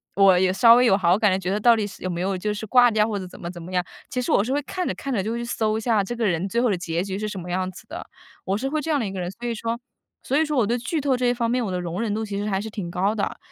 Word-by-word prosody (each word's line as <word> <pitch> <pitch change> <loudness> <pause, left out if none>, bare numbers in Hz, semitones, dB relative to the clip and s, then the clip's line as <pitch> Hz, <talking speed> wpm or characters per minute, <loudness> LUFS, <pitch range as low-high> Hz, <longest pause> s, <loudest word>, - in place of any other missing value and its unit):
我 195 -2 +6
也 185 0 +2
稍 230 +3 +7
微 250 +1 +5
有 195 -4 +5
好 180 0 +3
感 210 -3 +4
的， 185 - +2
觉 185 0 -3
得 205 - 0
到 235 +1 +6
底 215 -2 -1
是 200 - -10
有 185 - -2
没 175 0 -3
有 190 0 -1
就 210 +3 -2
是 210 +1 -5
挂 245 +2 +6
掉， 215 -1 +2
或 205 -3 -2
者 185 - -6
怎 - - -13
么 170 0 -5
怎 175 -2 -10
么 180 +2 -9
样。 180 -1 +1 0.3
其 255 -2 -2
实 - - -2
我 - - +4
是 250 +6 -2
会 290 - +1
看 360 +5 -4
着 - - -1
看 275 -2 -4
着 200 - +1
就 220 +4 -3
会 235 - -3
去 - - -3
搜 220 -2 0
一 - - -3
下 220 -3 +2
这 220 +5 -4
个 230 -1 -1
人 175 0 0
最 235 +4 0
后 245 - +2
的 185 - 0
结 170 0 -2
局 195 0 -4
是 215 - -2
什 205 - -5
么 180 0 -7
样 185 +1 -1
子 185 - -12
的。 - - -6 0.4
我 195 +2 0
是 270 +4 -2
会 310 +1 -1
这 320 - -5
样 300 - +3
的 235 - -1
一 195 - -4
个 190 - -5
人。 175 0 -3
所 240 +5 -10
以 - - -1
说 230 +1 -3 0.5
所 275 - 0
以 315 - +3
说 300 -2 -2
我 230 - +4
对 240 +3 0
剧 290 +6 -2
透 270 -2 +2
这 250 - -1
一 245 - +3
方 235 -1 -1
面， 250 -1 +1
我 205 - -2
的 180 - -2
容 175 +4 -4
忍 215 -3 -1
度 220 - -2
其 200 -1 -4
实 205 +1 -2
还 190 -1 0
是 220 - -6
挺 200 -5 -5
高 195 +4 0
的。 205 - -2
210 Hz, 405 characters per minute, -24 LUFS, 185-240 Hz, 0.5 s, 稍